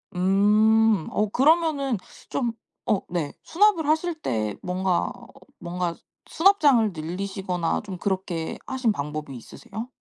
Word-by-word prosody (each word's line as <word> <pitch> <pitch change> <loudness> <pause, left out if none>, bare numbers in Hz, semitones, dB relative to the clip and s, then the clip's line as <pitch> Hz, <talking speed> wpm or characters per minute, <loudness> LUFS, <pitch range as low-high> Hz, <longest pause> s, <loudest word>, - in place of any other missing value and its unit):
음. 210 +2 +4
어 210 0 0
그러면은 285 -2 +2 0.3
좀 240 -3 -1 0.3
어 210 - +1
네 170 -5 -2
수납을 345 -4 +3
하실 320 +2 +1
때 110 - -2
뭔가, 180 -1 0 0.5
뭔가 175 -1 -3 0.3
수납장을 295 - +4
늘리시거나 180 +1 -3
좀 190 -3 -6
그렇게 185 -4 -2
하신 255 -4 0
방법이 150 -4 -5
있으세요? 220 - -9
200 Hz, 245 characters per minute, -25 LUFS, 175-260 Hz, 0.5 s, 음